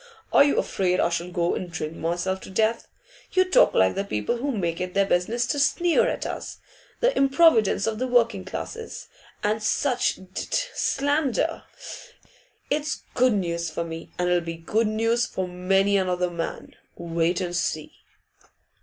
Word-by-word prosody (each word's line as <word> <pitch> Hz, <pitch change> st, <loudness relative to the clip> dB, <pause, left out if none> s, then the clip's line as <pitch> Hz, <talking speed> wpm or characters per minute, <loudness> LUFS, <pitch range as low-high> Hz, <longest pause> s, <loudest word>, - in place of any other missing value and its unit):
Are -, -, +8 dB
you 285 Hz, -, +2 dB
afraid 180 Hz, -1 st, 0 dB
I -, -, +3 dB
shall 170 Hz, +1 st, -3 dB
go 175 Hz, -1 st, 0 dB
and 180 Hz, -2 st, -4 dB
drink 155 Hz, -1 st, -4 dB
myself 175 Hz, +4 st, -2 dB
to -, -, -10 dB
death? 220 Hz, +4 st, 0 dB, 0.5 s
You 370 Hz, 0 st, +4 dB
talk 370 Hz, -, +4 dB
like 95 Hz, 0 st, +4 dB
the 195 Hz, -, -2 dB
people 105 Hz, -, -2 dB
who 280 Hz, +4 st, -2 dB
make 175 Hz, -8 st, -2 dB
it 180 Hz, 0 st, -4 dB
their 200 Hz, 0 st, +4 dB
business 215 Hz, +6 st, +1 dB
to 290 Hz, -, -1 dB
sneer 345 Hz, +4 st, +3 dB
at -, -, -2 dB
us -, -, -5 dB, 0.4 s
the -, -, +3 dB
improvidence 270 Hz, -, +4 dB
of 220 Hz, -1 st, -2 dB
the 255 Hz, -, -1 dB
working 230 Hz, -5 st, +2 dB
classes, 450 Hz, -, -7 dB, 0.3 s
and 215 Hz, +1 st, 0 dB
such 250 Hz, +4 st, +1 dB
d -, -, -14 dB
d -, -, -4 dB, 0.3 s
slander. 285 Hz, -, 0 dB, 1.1 s
It's 295 Hz, -1 st, -1 dB
good 255 Hz, -1 st, +3 dB
news 170 Hz, -4 st, -1 dB
for 170 Hz, -, -3 dB
me, 165 Hz, 0 st, -7 dB
and 180 Hz, -, 0 dB
it'll 180 Hz, 0 st, +2 dB
be 165 Hz, 0 st, -5 dB
good 215 Hz, +7 st, 0 dB
news 225 Hz, +2 st, +1 dB
for 185 Hz, -1 st, -3 dB
many 195 Hz, +3 st, +2 dB
another 180 Hz, -2 st, 0 dB
man. 170 Hz, -1 st, -5 dB, 0.2 s
Wait 170 Hz, 0 st, 0 dB
and 175 Hz, -2 st, -3 dB
see. 155 Hz, -2 st, -2 dB
195 Hz, 170 wpm, -25 LUFS, 175-245 Hz, 1.1 s, Are